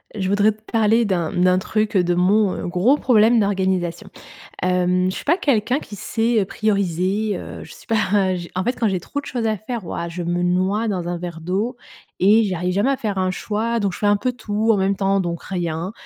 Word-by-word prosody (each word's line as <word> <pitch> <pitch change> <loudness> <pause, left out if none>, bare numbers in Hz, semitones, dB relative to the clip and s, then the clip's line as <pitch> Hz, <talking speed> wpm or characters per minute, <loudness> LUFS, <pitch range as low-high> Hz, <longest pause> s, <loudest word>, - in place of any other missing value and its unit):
Je 190 -2 -2
voudrais 205 +2 +3
te 215 - -25
parler 225 +1 +3
d'un, 175 -6 -1
mmh, 180 - 0
d'un 185 0 +4
truc, 215 +1 -1
heu, 180 - +4
de 175 0 +1
mon, 195 +2 +3
heu, - - -4
gros 185 +10 +3
problème 230 -3 +4
d'organisation, 190 -1 -1 0.5
hem, 180 0 +2
je - - -5
suis - - -6
pas 335 +5 +2
quelqu'un 255 - +1
qui 210 -8 -10
sait, 225 +3 0
heu, - - 0
prioriser, 200 0 -1
heu, - - -8
je - - -13
suis - - -15
pas, 200 -4 +1
j 175 -1 -7
en 185 - -1
fait 245 +6 0
quand 230 - +1
j'ai 190 -2 -1
trop 285 +11 -4
de - - -16
choses 240 -3 -3
à 215 -1 +1
faire, 215 -1 -6
waouh, 170 +1 -4
je 175 +1 -5
me 175 +1 -1
noie 185 +5 +1
dans 180 -4 -2
un 175 - -2
verre 170 -1 -6
d'eau 200 +9 -2 0.4
et 210 +4 +5
j'y 195 -3 -1
arrive 180 +1 -2
jamais 205 +8 +2
à 275 - 0
faire 210 -3 -3
un 185 0 +1
choix. 225 +4 -2
Donc, 200 -3 -1
je - - -8
fais 210 - 0
un 205 0 +4
peu 255 +4 -1
tout 220 -2 -1
en - - +2
même 195 0 +1
temps, 195 0 +1
donc 170 -2 -3
rien. 175 +1 -3
195 Hz, 245 wpm, -21 LUFS, 180-220 Hz, 0.5 s, et